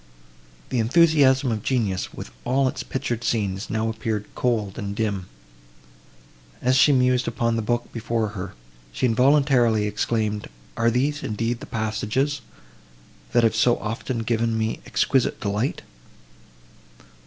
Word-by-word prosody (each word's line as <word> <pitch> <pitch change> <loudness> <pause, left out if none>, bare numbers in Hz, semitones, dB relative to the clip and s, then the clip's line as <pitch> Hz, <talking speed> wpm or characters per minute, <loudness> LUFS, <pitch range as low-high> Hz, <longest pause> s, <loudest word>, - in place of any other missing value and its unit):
The 125 - 0
enthusiasm 135 0 +4
of 110 -2 -2
genius, 110 -7 -1
with - - -9
all 130 +2 +2
its - - -3
pictured 120 -3 -3
scenes, 100 -4 -1
now 110 0 0
appeared 110 -2 -2
cold, 110 -4 -1
and 100 -2 -4
dim. 100 -4 -2 1.3
As 130 +1 +2
she 135 +3 +6
mused 125 -1 +3
upon 115 0 0
the 115 - 0
book 120 +2 -2
before 115 -1 -1
her, 100 - -7 0.4
she - - -1
involuntarily 125 -3 +3
exclaimed, 105 0 -1 0.3
"Are 115 0 +2
these, 140 +6 0
indeed, 115 -1 -2
the - - -9
passages, 115 +6 -1 0.9
that 120 - +4
have 115 -1 +3
so 120 +2 +3
often 115 +2 -3
given 115 0 0
me 110 0 -1
exquisite 130 -3 +1
delight? 105 +6 -2
115 Hz, 130 wpm, -24 LUFS, 110-125 Hz, 1.3 s, she